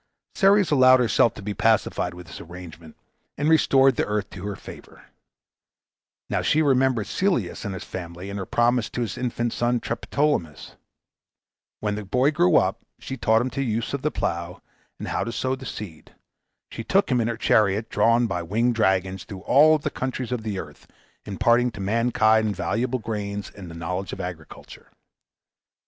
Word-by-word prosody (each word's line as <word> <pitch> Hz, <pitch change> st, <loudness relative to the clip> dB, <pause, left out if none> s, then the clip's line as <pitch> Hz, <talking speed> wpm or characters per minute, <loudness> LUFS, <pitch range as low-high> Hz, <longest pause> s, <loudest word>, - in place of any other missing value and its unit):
Ceres 200 Hz, -2 st, +4 dB
allowed 130 Hz, -2 st, +6 dB
herself 115 Hz, -2 st, +3 dB
to 105 Hz, -, -9 dB
be 105 Hz, +1 st, -3 dB
pacified 105 Hz, -3 st, +1 dB
with 90 Hz, 0 st, -10 dB
this 80 Hz, -, -10 dB
arrangement, 85 Hz, -2 st, -11 dB, 0.4 s
and 145 Hz, -, 0 dB
restored 135 Hz, -5 st, +4 dB
the -, -, +1 dB
earth 105 Hz, -1 st, -2 dB
to 95 Hz, +1 st, -7 dB
her 100 Hz, -, -4 dB
favor. -, -, -13 dB, 1.2 s
Now -, -, -1 dB
she 155 Hz, +1 st, +2 dB
remembered 130 Hz, -5 st, +2 dB
Celeus 190 Hz, -, -1 dB
and 100 Hz, -2 st, -3 dB
his 95 Hz, -, -7 dB
family, 90 Hz, +1 st, -7 dB
and 100 Hz, -, -5 dB
her 95 Hz, -, -5 dB
promise 120 Hz, 0 st, +1 dB
to 125 Hz, -, -4 dB
his 115 Hz, -5 st, -3 dB
infant 120 Hz, -1 st, -2 dB
son 120 Hz, 0 st, 0 dB
Triptolemus. 115 Hz, -, -2 dB, 1.1 s
When 105 Hz, -1 st, -1 dB
the 105 Hz, +1 st, -4 dB
boy 125 Hz, +8 st, +2 dB
grew 90 Hz, -, +3 dB
up, -, -, +2 dB, 0.2 s
she 135 Hz, -, -6 dB
taught 110 Hz, -2 st, +2 dB
him 130 Hz, -, -2 dB
the 135 Hz, -, -3 dB
use 115 Hz, -2 st, -2 dB
of 140 Hz, -, -2 dB
the 150 Hz, -, 0 dB
plough, 85 Hz, -, -4 dB, 0.3 s
and -, -, -7 dB
how -, -, -1 dB
to 115 Hz, -, -4 dB
sow 130 Hz, +2 st, -1 dB
the 130 Hz, -1 st, -9 dB
seed. 100 Hz, -7 st, -9 dB, 0.6 s
She 115 Hz, -, -6 dB
took 190 Hz, -, +1 dB
him 125 Hz, -1 st, +3 dB
in 115 Hz, -, 0 dB
her 115 Hz, -1 st, -2 dB
chariot, 105 Hz, -1 st, +2 dB
drawn 115 Hz, +1 st, +3 dB
by 90 Hz, -6 st, -2 dB
winged 115 Hz, +8 st, 0 dB
dragons, 95 Hz, -4 st, 0 dB
through 95 Hz, -2 st, -9 dB
all 155 Hz, +8 st, +5 dB
the 150 Hz, 0 st, -4 dB
countries 130 Hz, -1 st, -4 dB
of 125 Hz, -2 st, -2 dB
the 105 Hz, -3 st, -4 dB
earth, 75 Hz, -5 st, -9 dB, 0.4 s
imparting 120 Hz, +5 st, +2 dB
to 100 Hz, -, -10 dB
mankind 110 Hz, 0 st, +2 dB
valuable 120 Hz, +6 st, -1 dB
grains, 105 Hz, -3 st, -5 dB
and 95 Hz, -4 st, -10 dB
the 80 Hz, -, -10 dB
knowledge 90 Hz, +3 st, -4 dB
of -, -, -7 dB
agriculture. 90 Hz, -4 st, -9 dB
110 Hz, 180 wpm, -24 LUFS, 95-125 Hz, 1.2 s, allowed